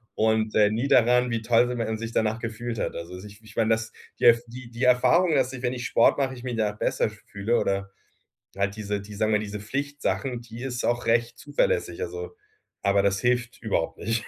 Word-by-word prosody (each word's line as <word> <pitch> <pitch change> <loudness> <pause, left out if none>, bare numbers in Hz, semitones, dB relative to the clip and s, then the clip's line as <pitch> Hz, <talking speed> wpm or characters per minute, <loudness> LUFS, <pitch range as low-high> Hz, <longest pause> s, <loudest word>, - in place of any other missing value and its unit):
und, 110 0 +1
äh, 105 -1 +5
nie 115 +6 -1
daran, 125 -2 +4
wie 115 -1 -1
toll 115 +2 +3
si 125 - -3
man 110 -2 -2
sich 115 +1 -5
danach 110 +1 +1
gefühlt 115 0 -4
hat. - - -2
Also, 85 +2 -7
ich 105 +1 -13
ich 110 0 -15
meine, 115 -1 +2
dass 110 0 0 0.3
der 115 -1 +7
die 120 0 -10
die 120 +2 -5
Erfahrung, 155 +7 +4
dass 130 -1 +1
ich, 130 - -7
wenn 125 0 0
ich 125 -1 -5
Sport 115 - +4
mache, 135 -2 0
ich 120 - -11
mich 125 -2 -3
danach 105 -2 0
besser - - +1
fühle 105 +2 -2
oder 100 0 -1 0.7
halt 100 +1 -1
diese 105 -1 -3
die, 105 +1 -10
sagen 110 +1 +1
wir, 105 - +4
diese 105 0 -5
Pflichtsachen, 135 +1 -2
die 115 +1 -10
ist 125 -2 -3
auch 120 0 0
recht 115 +1 +1
zuverlässig, 485 -2 -1
also, 445 +1 -6 0.5
aber 100 0 +3
das 100 0 +1
hilft 125 0 0
überhaupt 100 -7 -1
nicht. 115 +1 -1
115 Hz, 215 wpm, -26 LUFS, 105-125 Hz, 0.7 s, der